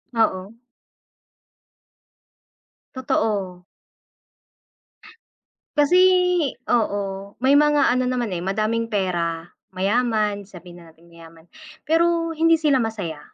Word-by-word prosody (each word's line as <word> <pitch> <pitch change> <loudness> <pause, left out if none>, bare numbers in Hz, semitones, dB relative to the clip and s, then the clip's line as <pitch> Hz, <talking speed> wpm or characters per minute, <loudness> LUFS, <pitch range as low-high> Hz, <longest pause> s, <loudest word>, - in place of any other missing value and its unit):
Oo. 205 -1 -1 2.4
Totoo. 200 -8 -2 2.1
Kasi 295 +5 +4 0.7
oo. 200 -3 -2
May 270 +2 +4
mga 295 -2 +3
ano 255 +1 +1
naman, 245 -4 -2
eh, 175 - -3
madaming 215 +5 -1
pera, 175 -5 -2 0.3
mayaman, 210 0 0
sabihin 175 -2 -13
na 165 - -16
natin 170 +2 -23
mayaman, 165 -1 -16 0.4
pero 330 +1 +1
hindi 330 +1 +3
sila 300 -5 +1
masaya. 200 -9 -4
210 Hz, 90 wpm, -22 LUFS, 185-255 Hz, 2.4 s, Kasi